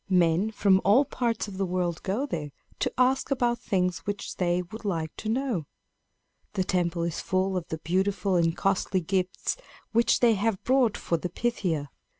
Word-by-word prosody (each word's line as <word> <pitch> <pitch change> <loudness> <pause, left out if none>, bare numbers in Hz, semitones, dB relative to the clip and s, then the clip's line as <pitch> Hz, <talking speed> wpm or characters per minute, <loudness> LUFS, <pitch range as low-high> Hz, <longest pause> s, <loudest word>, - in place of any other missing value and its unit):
Men 180 +2 +3
from 200 -3 +3
all 230 +9 +5
parts 235 -4 -1
of 195 -2 -8
the 195 - +1
world 175 -2 -1
go 210 +8 -1
there 155 - -4 0.3
to - - 0
ask 255 +1 +2
about 245 -3 +1
things 180 -3 0
which 205 -1 -5
they 180 0 +1
would 220 +6 -10
like 165 -6 -2
to 215 - -4
know. 230 - -1 0.9
The 190 - +1
temple 175 -2 0
is 170 -1 -2
full 190 0 0
of 180 -3 -2
the 160 - -4
beautiful 190 +3 0
and 165 -1 +2
costly 190 -1 +1
gifts 185 - -1 0.3
which 235 +1 +3
they 235 -2 +5
have 210 -1 0
brought 255 -3 +3
for 170 - -1
the 175 +3 -4
Pythia. 175 - -1
190 Hz, 175 wpm, -27 LUFS, 175-220 Hz, 0.9 s, all